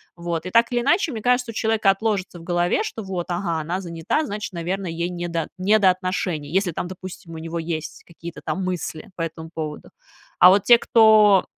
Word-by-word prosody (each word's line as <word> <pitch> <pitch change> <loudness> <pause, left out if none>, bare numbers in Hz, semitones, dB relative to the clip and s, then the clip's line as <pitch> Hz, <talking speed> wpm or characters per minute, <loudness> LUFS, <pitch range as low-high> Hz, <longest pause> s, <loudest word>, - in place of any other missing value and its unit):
Вот. 170 -1 -4
И - - -3
так 230 +3 +4
или 240 -1 +1
иначе, 340 - +2
мне 225 -4 -5
кажется, 250 0 +1
у - - -13
человека 220 -2 +1
отложится 195 -3 -2
в - - -12
голове, 175 - +1
что 225 - -6
вот, 185 -3 -4
ага, 175 -2 -1
она 170 +5 -3
занята, 170 - -2
значит, 210 -4 -5
наверно, 180 +3 -3
ей 170 +1 -3
не 175 -1 -4
до 165 -2 -2
не 200 +4 +3
до 195 -2 +5
отношений. 180 -5 -3
Если 190 0 +1
там, 170 - -4
допустим, 185 -2 -9
у - - -6
него 165 +1 -5
есть 160 -1 -5
какие-то 170 0 -10
там 190 - -2
мысли 175 -3 -4
по 175 - -6
этому 165 0 -5
поводу. 155 -2 -6 0.5
А 180 - +9
вот 195 +1 +4
те, 240 - +7
кто 215 -4 +5
180 Hz, 210 wpm, -22 LUFS, 170-210 Hz, 0.5 s, А